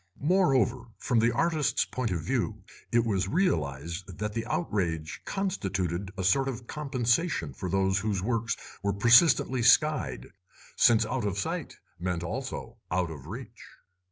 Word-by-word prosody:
Moreover, 135 - +2
from 120 - +1
the 115 +1 +3
artists' 155 +3 +1
point 130 -3 -3
of 90 -4 -2
view 110 +1 -2 0.3
it 120 0 +3
was 95 -4 0
realised 85 - -1
that 105 0 -3
the 115 +1 -3
outrage 85 - -2
constituted 95 - -2
a 95 - -2
sort 135 +9 +3
of 120 -2 -5
compensation 130 - 0
for 90 - -5
those 95 +1 +2
whose 105 -1 -1
works 115 +3 -1 0.2
were 100 0 0
persistently 120 - +5
'skied', 125 - +3 0.4
since 115 -2 +5
out 115 +2 -2
of 100 -1 -1
sight 95 - -3 0.2
meant 90 -1 -2
also 85 - -5
out 90 -1 0
of 75 -2 -9
reach. 115 +5 -9
110 Hz, 145 wpm, -28 LUFS, 90-130 Hz, 0.4 s, persistently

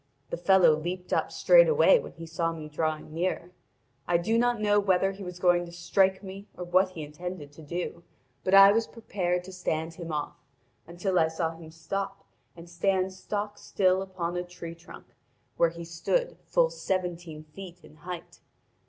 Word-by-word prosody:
The - - -2
fellow 190 -1 +5
leaped 180 +4 -4
up - - +1
straightway - - +6
when - - -9
he 165 -1 -9
saw 165 +1 -1
me 160 -2 -7
drawing 155 0 -3
near. 175 +1 -2 0.6
I 175 - +3
do 190 +7 0
not 240 0 +2
know 205 -1 +3
whether 195 -1 +2
he 195 +1 -9
was 180 -1 -7
going 175 -1 +3
to - - -10
strike 190 +3 +1
me 195 +1 -9
or 180 - -5
what 185 +2 +3
he 160 -4 -6
intended 150 0 -7
to 150 - -14
do, 170 +2 -5 0.4
but 185 - +3
I 195 0 +10
was 225 +2 +1
prepared 180 -6 -2
to 190 - -10
stand 165 -3 -2
him 170 -1 -7
off, 150 -1 -3 0.5
until 180 +2 0
I 160 - +4
saw 160 0 -2
him 165 -1 -12
stop 195 +5 -5 0.3
and 170 +1 -11
stand 190 +2 0
stock 205 +2 -4
still 185 -1 +2
upon 185 -3 -4
a 180 - -1
tree 175 -2 -9
trunk, 170 0 -13 0.5
where 170 - +4
he 170 0 -9
stood 485 - -1
full - - +3
seventeen 175 - -3
feet 175 +3 -11
in 155 - -16
height. 175 +1 -8
180 Hz, 180 wpm, -28 LUFS, 165-195 Hz, 0.6 s, I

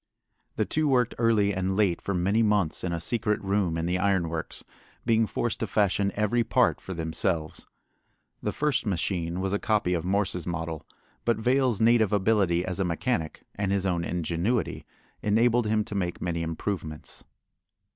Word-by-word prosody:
The - - +1
two 155 0 0
worked 125 -4 +2
early 110 -4 +3
and 95 +1 -1
late 100 -5 +2
for 100 - -2
many 100 +6 +2
months 105 -7 +1
in 90 - -1
a 85 - -2
secret 105 +4 0
room 95 -4 0
in 80 - -1
the 90 +2 0
iron 95 -4 +1
works, 80 -1 -5 0.4
being 115 -1 +3
forced 115 +1 -2
to 110 - -2
fashion 100 0 +1
every 105 +3 +1
part - - +2
for 95 - -6
themselves. 80 -1 -2 0.7
The - - -1
first 150 -6 0
machine 90 -2 -1
was 95 0 -1
a 100 - +1
copy 105 -5 +1
of 85 -2 -1
Morse's 90 -2 -1
model, 80 -2 -4 0.4
but 115 -2 +1
Vail's 125 0 +2
native 115 -2 +4
ability 95 -4 +2
as 95 0 -4
a - - +2
mechanic 85 -1 -2
and 100 -1 -2
his 100 -1 0
own 85 -3 0
ingenuity 90 +7 -1 0.3
enabled 115 +2 +3
him 110 0 +2
to 105 - -7
make 90 -3 -2
many 85 -1 -2
improvements. 80 -1 -5
100 Hz, 170 wpm, -27 LUFS, 85-110 Hz, 0.7 s, native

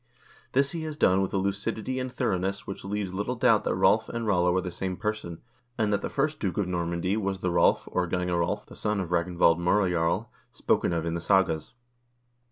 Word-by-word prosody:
This 140 +1 +2
he 165 - -4
has 155 -1 -5
done 95 -8 +4
with 95 - -1
a - - 0
lucidity 105 +6 -2
and 130 0 -3
thoroughness 95 -2 -1
which 95 - -7
leaves 100 -1 -3
little 105 +6 -2
doubt 115 -3 +3
that - - +1
Rolv - - +3
and 115 -1 -3
Rollo 90 -3 +2
are - - +3
the 90 -1 -5
same 90 +1 -4
person, 105 -6 -4 0.3
and 105 -3 +1
that 100 - +1
the - - -3
first 150 +2 -1
duke 95 -4 -2
of 100 -3 0
Normandy 85 +1 -1
was 100 -3 -2
the 90 - 0
Rolv, 85 0 +3
or 90 -1 -1
Gange 90 +1 -1
Rolv, 90 +4 -1
the - - -13
son 105 -1 -1
of 90 -3 -3
Ragnvald 85 -1 +2
M0rejarl, 90 -2 +1 0.3
spoken - - +1
of 85 -1 -1
in 85 - -1
the 85 - -3
sagas. 95 -3 +1
95 Hz, 210 wpm, -27 LUFS, 90-105 Hz, 0.3 s, done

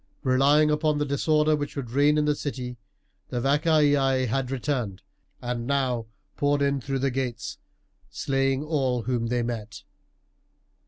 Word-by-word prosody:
Relying 145 +3 +4
upon 150 0 +1
the 145 - 0
disorder 150 +2 +2
which 145 -1 -4
would 130 -5 -5
reign 145 +3 +3
in 150 - +2
the 150 - +3
city, 125 -4 -5 0.5
the 125 - -2
Vacaei 145 -2 +3
had 125 +2 -1
returned, 125 -7 -2 0.4
and 120 -1 -3
now 130 -5 0 0.3
poured 145 0 +2
in 140 -1 +1
through 135 +2 -2
the 135 0 0
gates, 125 -2 -4 0.5
slaying 135 0 0
all 135 -6 0
whom 120 -1 -1
they 120 0 0
met. 110 -2 -5
135 Hz, 145 wpm, -26 LUFS, 125-145 Hz, 0.5 s, Relying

